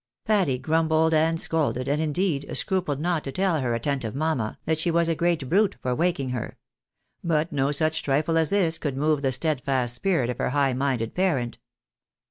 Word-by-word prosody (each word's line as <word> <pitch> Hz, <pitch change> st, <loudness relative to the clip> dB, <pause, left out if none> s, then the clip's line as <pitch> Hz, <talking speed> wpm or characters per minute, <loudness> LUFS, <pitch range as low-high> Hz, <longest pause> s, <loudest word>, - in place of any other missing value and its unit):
Patty 195 Hz, -, +2 dB
grumbled 160 Hz, +3 st, +1 dB
and 160 Hz, +1 st, +2 dB
scolded, 145 Hz, -6 st, 0 dB
and, 145 Hz, +2 st, 0 dB
indeed, 160 Hz, -1 st, -1 dB
scrupled 180 Hz, -8 st, 0 dB
not 170 Hz, 0 st, -1 dB
to 135 Hz, -, -5 dB
tell 185 Hz, -1 st, +1 dB
her 120 Hz, -2 st, 0 dB
attentive 125 Hz, -2 st, -2 dB
mamma 140 Hz, -7 st, -1 dB
that 160 Hz, -1 st, 0 dB
she 170 Hz, -, 0 dB
was 170 Hz, 0 st, +2 dB
a 165 Hz, -, +2 dB
great 165 Hz, -4 st, 0 dB
brute 200 Hz, +6 st, +2 dB
for 125 Hz, -, -1 dB
waking 155 Hz, -3 st, 0 dB
her; 125 Hz, -3 st, -5 dB, 0.7 s
but 160 Hz, -1 st, 0 dB
no 140 Hz, 0 st, 0 dB
such 155 Hz, +2 st, 0 dB
trifle 150 Hz, +4 st, 0 dB
as 160 Hz, -2 st, +2 dB
this 175 Hz, -5 st, +1 dB
could 140 Hz, -4 st, -3 dB
move 150 Hz, 0 st, +1 dB
the 135 Hz, -2 st, +1 dB
steadfast 130 Hz, -3 st, 0 dB
spirit 130 Hz, -3 st, 0 dB
of 125 Hz, -, -8 dB
her -, -, 0 dB
high 135 Hz, -1 st, +1 dB
minded 125 Hz, -4 st, -1 dB
parent. 150 Hz, -11 st, -1 dB
155 Hz, 185 wpm, -25 LUFS, 135-165 Hz, 0.7 s, Patty